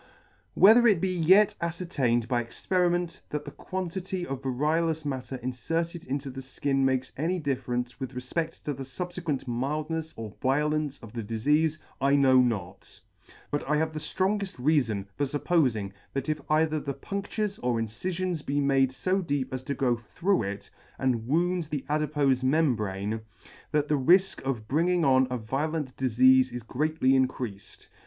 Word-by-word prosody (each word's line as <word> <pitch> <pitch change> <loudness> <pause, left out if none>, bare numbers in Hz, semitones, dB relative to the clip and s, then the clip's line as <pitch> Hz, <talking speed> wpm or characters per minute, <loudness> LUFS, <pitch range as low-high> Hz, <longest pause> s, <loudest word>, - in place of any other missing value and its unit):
Whether 230 +5 +7
it 205 -6 +4
be 185 +1 0
yet 190 +5 +5
afcertained 155 -9 0
by 120 -1 +1
experiment, 175 +7 -1
that 150 - -4
the - - -7
quantity 185 0 -4
of 135 -4 -5
variolous 155 +4 0
matter 130 -2 -4
infer 130 +7 -1
ted 170 0 -9
into 135 +1 -3
the 135 +1 -7
Ikin 135 +1 -2
makes 130 -1 +1
any 170 +6 0
difference 125 -5 -2
with 130 -1 -5
refpeCt 160 +6 -3
to 145 - -2
the 135 - -8
fubfequent 165 +1 -4
mildnefs 150 +6 -3
or 110 -2 -7
violence 150 +1 +1
of 115 - -11
the 120 - -3
difeafe, 150 +9 +1 0.2
I 140 +1 +4
know 130 -2 +5
not; 100 -7 -3 0.5
but 145 - -1
I 150 - +3
have 160 +1 0
the 155 - -4
ftrongeft 195 +4 -1
reafon 125 -8 +1
for 145 - -1
fup 145 +2 -4
pofing 125 - +2 0.2
that 135 +1 -2
if 155 -1 -1
either 155 0 +2
the 140 -2 -4
punCtures 200 +5 -3
or 120 -2 0
incifions 170 - -3
be 145 +1 -1
made 135 -2 +3
fo 190 +5 0
deep 145 -6 -2
as 130 - -3
to 140 - -2
go 125 -3 +2
through 170 - 0
it, 100 -1 -5 0.3
and 120 -4 0
wound 175 +4 +1
the 150 -3 -4
adipofe 145 -3 +1
membrane, 110 -8 0 0.5
that 150 -1 +1
the 150 -1 +1
rifk 185 +8 +4
of 125 -5 -3
bringing 170 +4 +2
on 130 -1 +4
a 125 - -1
violent 135 +4 -2
difeafe 130 +1 +4
is 120 -1 -6
greatly 150 +3 +1
increafed. 125 -6 -1
140 Hz, 165 wpm, -28 LUFS, 125-165 Hz, 0.5 s, Whether